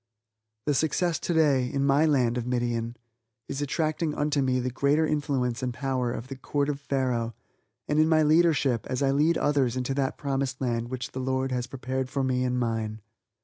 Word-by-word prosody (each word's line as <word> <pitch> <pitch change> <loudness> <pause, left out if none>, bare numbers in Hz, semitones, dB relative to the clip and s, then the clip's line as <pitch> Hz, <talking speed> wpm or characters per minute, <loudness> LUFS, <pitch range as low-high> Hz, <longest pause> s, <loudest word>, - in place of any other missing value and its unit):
The 145 - +2
success 160 +4 +1
today, 150 -7 +2
in 140 0 0
my 145 +3 +4
land 125 -6 +2
of 120 -1 -3
Midian, 120 -1 -1 0.5
is 140 +1 -4
attracting 155 +2 -1
unto 145 -1 +1
me 130 -1 +1
the 125 0 -2
greater 140 +5 +2
influence 135 -6 -1
and 125 -1 -1
power 130 -1 -1
in 120 - -4
my 135 0 -7
Court 140 +2 -1
of 140 -1 -2
Pharaoh, 125 -5 -1 0.5
and 150 +1 +1
in 155 +1 +4
my 155 -1 +4
leadership, 150 -7 +3
as 130 +1 -1
I 135 - +3
lead 155 +4 +3
others 135 -4 +1
into 130 +1 -1
that 135 -1 -1
promised 135 -2 -2
land 120 -2 -1
which 130 -1 -5
the 130 - -5
Lord 130 0 -1
has 125 -1 -2
prepared 130 0 -3
for 140 0 -1
me 130 -1 +1
and 125 0 0
mine. 110 -2 -2
135 Hz, 190 wpm, -27 LUFS, 125-145 Hz, 0.5 s, my